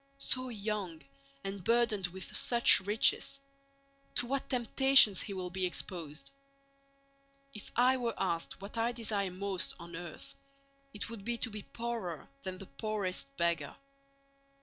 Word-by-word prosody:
So 255 -2 +1
young, 205 - -4 0.4
and 195 -1 -5
burdened 225 -4 +2
with 185 +1 -7
such 235 -1 +6
riches—to 275 +5 -1
what 270 +2 -3
temptations 250 -3 +6
he 200 - -5
will 180 -2 -5
be 190 +1 -3
exposed! 165 - -4 1.2
If 210 - -8
I 255 +2 +4
were 235 -3 -2
asked 170 -1 -2
what 200 +3 -6
I 235 +2 +1
desire 215 -4 -1
most 185 0 0
on 170 0 -9
earth, 170 -2 -8 0.6
it 210 0 -4
would 225 -4 -7
be 235 +2 0
to 230 - 0
be 210 0 -5
poorer 230 -8 -5
than 185 -1 -5
the 195 - -9
poorest 200 - -4
beggar. 170 -1 0
210 Hz, 135 wpm, -32 LUFS, 185-240 Hz, 1.2 s, such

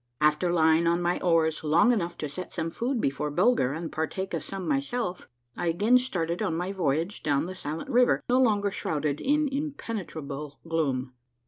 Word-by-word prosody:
After 150 +3 +3
lying 160 0 +4
on 170 +1 +3
my 175 0 0
oars 165 -3 +2
long 170 +9 +4
enough 175 -7 -1
to 150 - -3
set 180 +5 -7
some 165 0 -3
food 245 +7 -1
before 145 -3 -1
Bulger 180 - +2
and 160 +2 -5
partake 175 +5 -3
of - - -1
some 195 -2 -5
myself, 245 -9 -2 0.3
I 175 - -2
again 210 +9 +4
started 175 -9 -2
on 160 - 0
my 180 +2 -2
voyage 170 0 -1
down 145 0 +1
the 185 - -5
silent 160 -3 -5
river, 245 +1 +4
no 255 +1 +4
longer 205 -4 +2
shrouded 150 -6 -2
in 295 +2 +2
impene 270 -7 -3
trable 145 -1 -6
gloom. 140 -6 -1
170 Hz, 185 wpm, -27 LUFS, 155-210 Hz, 0.3 s, lying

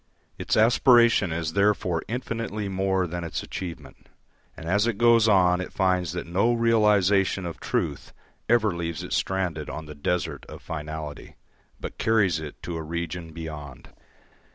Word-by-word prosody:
Its - - 0
aspiration 115 -3 +5
is 80 -1 -2
therefore 100 -4 +1
infinitely 115 -3 -3
more 95 -1 0
than 90 0 -5
its 85 - -4
achievement, 80 -7 -8 0.5
and 80 - -8
as 100 +5 +2
it 115 -4 -1
goes 115 -1 +5
on 90 -3 +4
it 90 - -6
finds 90 -3 +1
that 85 - -4
no 95 +8 +2
realisation 105 -5 +3
of 85 - -6
truth - - -2 0.4
ever 110 -5 +3
leaves 85 -2 -4
it - - -5
stranded 90 -5 -1
on 80 - -6
the 75 - -9
desert 80 0 -2
of - - -10
finality, 75 -1 -7 0.4
but - - -7
carries 100 -7 +2
it 75 -2 -8
to 85 -1 -4
a - - -4
region 85 +1 -5
beyond. 75 -5 -8
90 Hz, 155 wpm, -25 LUFS, 80-105 Hz, 0.5 s, aspiration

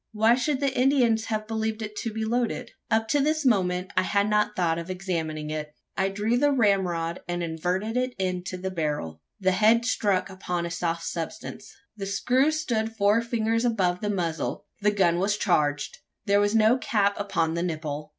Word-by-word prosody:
Why 220 +2 +4
should 265 +2 0
the 275 -2 0
Indian 255 -3 +4
have 215 -1 -2
believed 220 0 -2
it 210 0 -6
to 230 - -3
be 220 0 -3
loaded? 235 +1 -1 0.2
Up 220 0 +2
to 290 - +3
this 305 +1 +1
moment, 185 -5 +1
I 185 - +4
had 200 +2 +1
not 210 0 +1
thought 170 -2 +1
of 170 +2 -7
examining 165 -5 -3
it. 150 -1 -5 0.2
I 190 0 +1
drew 210 +4 0
the 290 +1 +3
ramrod, 185 -8 +1
and 175 0 -2
inverted 180 +7 -2
it 255 0 -1
into 185 -1 -2
the 190 +1 -4
barrel. 150 - -3 0.2
The 190 -1 +2
head 220 +5 +4
struck 205 -5 +1
upon 180 -3 -3
a 170 - -4
soft 170 0 -2
substance. 205 +5 -6 0.2
The 195 -2 -5
screw 255 +8 +2
stood 230 -8 -1
four 210 +2 +3
fingers 230 -1 0
above 190 -7 +1
the 210 - -1
muzzle: 170 -5 -2 0.2
the 210 - +4
gun 180 -4 +2
was 205 +2 +1
charged! 145 -7 0 0.3
There 200 0 +4
was 205 +1 +2
no 225 +3 +4
cap 205 -4 +2
upon 170 -5 0
the 170 - -1
nipple. 155 -3 -4
200 Hz, 190 wpm, -26 LUFS, 175-225 Hz, 0.3 s, Why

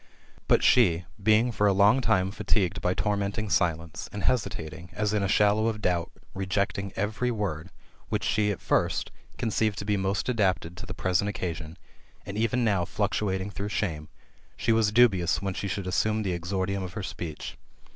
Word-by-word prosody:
But - - +4
she, 90 -8 +4 0.2
being 110 +4 +4
for 105 -2 +2
a 100 - +4
long 100 +7 +5
time 95 -6 +2
fatigued 100 -2 0
by 90 +1 +1
tormenting 105 0 -1
silence, 85 -1 0
and 100 -2 -5
hesitating, 85 -6 -2
as 105 0 -1
in 105 - +1
a 100 - +1
shallow 105 +2 +3
of 110 -2 -1
doubt, 90 -5 0 0.2
rejecting 100 0 -1
every 105 +5 -1
word, 100 -9 -3 0.4
which - - -1
she, 105 -1 +1
at 100 - -3
first, - - 0 0.3
conceived 110 -2 0
to 100 - -4
be 105 -1 +1
most 95 +1 -1
adapted 95 -7 0
to - - -8
the 95 - -6
present 95 +2 +1
occasion, 85 -5 -5 0.5
and 100 - -6
even 115 +3 +1
now 100 -6 +2
fluctuating 95 +2 -1
through 100 +1 -4
shame, 80 -8 -2 0.5
she 115 - +1
was 110 -2 +3
dubious 105 -7 +4
whence 95 -2 -3
she 100 - -3
should 95 0 -3
assume 110 +4 +1
the 95 -3 -1
exordium 95 +3 -2
of 95 0 -6
her 105 - -5
speech. 85 -3 -6
100 Hz, 175 wpm, -27 LUFS, 90-105 Hz, 0.5 s, long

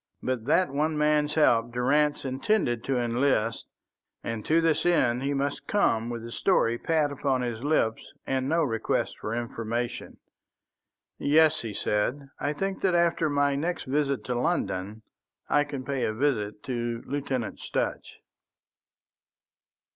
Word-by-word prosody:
But 125 -3 -2
that 155 +2 +3
one 150 +2 0
man's 150 0 +2
help 120 -7 +3
Durrance 145 +5 +1
intended 130 - 0
to 135 -1 0
enlist, 120 -1 0 0.6
and 115 -2 -4
to 160 +2 +4
this 165 -2 +2
end 130 -9 +2
he 140 +1 -1
must 140 +1 -2
come 115 - +1
with 120 -1 -5
the 115 - -8
story 120 -8 +2
pat 155 -3 +1
upon 135 -2 0
his 120 -1 -4
lips 140 -7 +1 0.2
and 130 0 -1
no 165 +1 +2
request 115 -6 -1
for 105 - -3
information. 120 0 -4 1.0
"Yes," 155 +1 +4
he 110 -3 -6
said, 130 +9 -1
"I 145 - 0
think 195 +5 -3
that 185 -2 +2
after 170 -2 +2
my 145 -1 +2
next 165 +6 -2
visit 140 0 0
to 125 - -2
London 110 - -2 0.4
I 145 - +3
can 140 -3 -6
pay 135 -2 -2
a 110 - -2
visit 105 -6 -1
to 120 -2 -3
Lieutenant 135 -5 -3
Sutch." - - -3
135 Hz, 145 wpm, -27 LUFS, 120-150 Hz, 1.0 s, to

